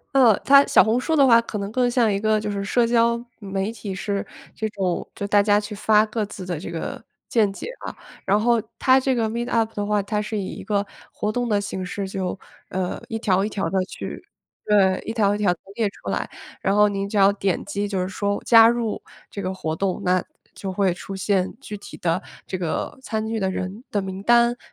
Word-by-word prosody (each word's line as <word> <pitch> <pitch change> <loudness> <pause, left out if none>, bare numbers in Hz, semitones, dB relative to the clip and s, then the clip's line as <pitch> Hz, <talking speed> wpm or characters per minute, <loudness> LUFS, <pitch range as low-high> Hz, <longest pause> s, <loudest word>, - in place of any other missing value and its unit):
呃， 240 -6 +6
它 280 0 +6
小 - - +6
红 225 +3 +2
书 320 +5 0
的 280 -3 +6
话 230 -3 +7
可 230 -2 -6
能 200 +1 -4
更 250 +1 +2
像 240 -3 +3
一 200 - 0
个 215 0 +2
就 210 0 -3
是 200 -1 -3
社 235 +3 +2
交， 235 0 +2 0.2
媒 195 0 -3
体 200 -3 -6
是， 200 +1 -2 0.3
这 220 - -2
种 185 -4 -2
就 200 - -4
大 205 0 +5
家 205 0 +4
去 210 0 -6
发 210 +1 +3
各 215 0 -2
自 195 -2 -8
的 175 -4 -3
这 - - -7
个， 165 - -5 0.3
见 215 -4 +3
解 - - -7 0.2
啊。 - - -6 0.3
然 200 +2 +3
后 235 +1 +3 0.2
它 260 0 +5
这 260 0 +1
个 225 -2 0
Meetup 230 -1 -1
的 205 0 -2
话， 210 -1 +1
它 210 +1 -1
是 215 0 -3
以 195 - -2
一 - - -7
个 205 -1 0 0.3
活 210 - -2
动 245 +2 -1
的 205 -2 +1
形 190 -2 -4
式， 195 +1 -4
就， 190 -1 -3 0.3
呃， 185 -1 -3
一 225 - -3
条 195 -3 +1
一 - - 0
条 200 -2 -2
地 190 -1 +1
去， - - -7 0.4
对， 195 -3 +3
一 225 - -3
条 205 -3 +2
一 - - -1
条 200 -4 +2
地 175 - -16 0.2
列 225 -3 +2
出 - - -9
来。 - - -2 0.3
然 195 - +1
后 210 0 +5
您 200 0 -2
只 215 - -6
要 200 -1 +6
点 195 -3 -1
击 205 +1 -3
就 195 -2 -1
是 185 - -2
说 200 +1 -2
加 225 -1 +8
入 235 -2 0 0.3
这 200 - -6
个 185 0 -2
活 160 -4 -3
动， 190 +3 -1
那 185 -1 +2 0.3
就 190 -2 -5
会 190 -2 +2
出 195 +2 -8
现 190 -1 0
具 210 - -7
体 200 - -11
的 170 +2 0 0.2
这 185 - -4
个 180 - -3
参 220 -4 -3
与 225 0 -1
的 190 -2 0
人 190 +6 -5
的 205 - 0
名 190 0 -6
单。 235 +2 +4
205 Hz, 260 characters per minute, -23 LUFS, 195-225 Hz, 0.4 s, 加